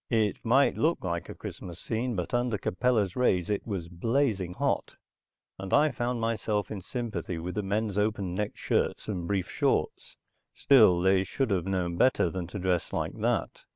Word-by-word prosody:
It 110 -4 +1
might 130 +5 +3
look 165 +3 +1
like 85 -3 -3
a - - -7
Christmas 85 -1 -8
scene, 120 +1 -2
but 90 -2 -4
under 120 -2 +1
Capella's 105 -1 0
rays 100 -7 +2
it 105 - -2
was 95 -6 -3
blazing 100 0 0
hot, - - -1 0.6
and 95 0 -6
I 150 +1 +4
found 120 0 -2
myself 110 -3 -1
in 105 -3 -5
sympathy 115 -5 -4
with 90 +3 -4
the 105 - -1
men's 105 +1 -1
open 105 -4 -1
necked 105 +3 -3
shirts - - -1
and 90 -5 -3
brief 95 -2 -1
shorts. - - -1 0.4
Still, 110 -10 +6
they 95 0 +4
should 115 +4 -2
have 95 -2 0
known 90 -3 -1
better 115 -8 +3
than 90 -2 -4
to 100 - -7
dress 90 -2 0
like - - -2
that. - - -1
100 Hz, 180 wpm, -28 LUFS, 90-115 Hz, 0.6 s, Still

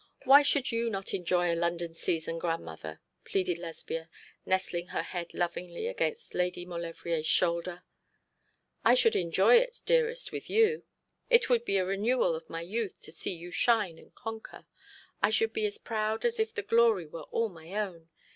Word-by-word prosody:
Why 275 +3 +9
should 285 -2 +1
you 230 0 0
not 195 -3 -4
enjoy 175 -2 +1
a - - 0
London 170 0 -1
season, 165 0 -2
grandmother?' 80 - -4 0.2
pleaded 180 -3 -1
Lesbia, 165 -1 -6 0.4
nestling 185 -2 0
her - - -2
head 175 -2 -5
lovingly 175 - -3
against 470 -1 -2
Lady 180 0 -1
Maulevrier's 170 -2 -3
shoulder. 175 +2 +1 1.0
'I - - +6
should 470 -3 +4
enjoy 180 - +5
it, - - -4
dearest, 485 0 +2
with - - -6
you. 450 +1 +3 0.4
It 475 - +5
would 235 -1 +4
be 195 - +1
a 185 - +1
renewal 200 0 +1
of 160 0 -7
my 165 - -4
youth 210 +4 -3
to - - -9
see 165 - -4
you 175 +1 -9
shine 205 -4 +2
and - - -18
conquer. 225 -2 -8 0.6
I - - +4
should 450 0 +1
be 435 -1 +1
as 420 +1 -6
proud 220 - -2
as 475 -1 +1
if 440 0 +1
the 435 -2 -4
glory 230 - +4
were 155 0 -9
all 230 -1 0
my 165 -2 -13
own. 180 -6 -4
185 Hz, 175 wpm, -30 LUFS, 170-240 Hz, 1.0 s, Why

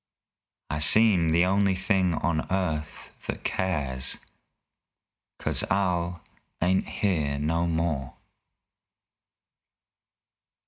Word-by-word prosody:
I 75 - -2
seem 95 0 +5
the 85 +3 +3
only 95 0 +2
thing 95 -2 +1
on 80 -1 -1
earth 80 -6 -3 0.2
that - - -4
cares 70 -8 -1 1.2
'Cause - - -2
Al 90 -3 0 0.4
ain't 90 +2 +1
here 75 -8 -1
no 80 +4 0
more! 80 -5 -2
85 Hz, 85 wpm, -26 LUFS, 75-95 Hz, 1.2 s, seem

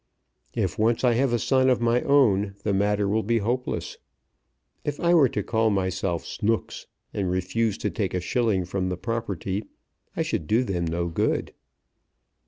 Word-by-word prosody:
If 95 0 -1
once 115 +3 +2
I 125 -2 +4
have 130 +2 +2
a 120 - +2
son 130 +3 +3
of 125 - +3
my 120 +1 +2
own 105 -8 +3
the 105 - 0
matter 100 +1 +1
will 110 +3 +1
be 115 +3 +1
hopeless. 120 +4 -2 0.8
If 145 - -3
I 170 0 +3
were 150 -7 +6
to 105 - -2
call 110 +1 +1
myself 95 -3 -1
Snooks, 115 0 -2 0.3
and 95 -3 -1
refused 95 +4 -1
to - - -1
take 100 -4 -2
a - - +1
shilling 105 -1 0
from 95 0 -2
the 90 - -3
property, 100 -1 -3 0.5
I - - +2
should 75 - -2
do 115 +4 +3
them 90 -7 -2
no 85 +1 -1
good. 85 - -1
105 Hz, 175 wpm, -25 LUFS, 95-120 Hz, 0.8 s, were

